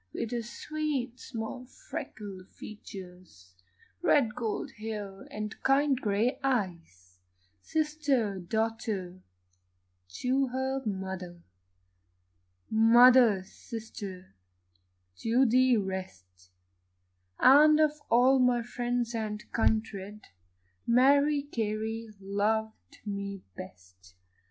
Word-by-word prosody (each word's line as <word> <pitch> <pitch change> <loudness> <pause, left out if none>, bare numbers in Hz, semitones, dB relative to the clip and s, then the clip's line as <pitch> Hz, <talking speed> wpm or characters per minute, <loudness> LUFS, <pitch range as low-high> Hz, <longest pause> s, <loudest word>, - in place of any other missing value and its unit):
With 230 - -3
her 240 -1 -1
sweet 265 +1 -4
small 240 +1 -6
freckled 210 - -8
features, 180 - -12 0.5
Red 240 -6 +3
gold 225 -3 -3
hair, 205 -3 -6
and 210 0 -5
kind 275 +1 +3
grey 215 +5 0
eyes; 165 - -3 0.4
Sister, 285 - 0
daughter, 210 -2 -3 1.0
to 265 +2 +2
her 265 +1 -2
mother, 190 -3 -5 1.3
Mother, 230 -2 +6
sister, 195 - -9 0.8
to 240 +4 +2
the 255 +1 +4
rest 95 - -6 0.9
And 300 +3 +7
of 300 -1 +2
all 255 +3 +5
my 250 -2 +3
friends 245 0 -2
and 215 -2 -3
kindred, 215 -2 -1 0.6
Mary 280 +4 +4
Carey 225 -3 -3
loved 215 +3 -2
me 200 -1 -5
best. 90 0 -13
220 Hz, 85 wpm, -29 LUFS, 195-255 Hz, 1.3 s, And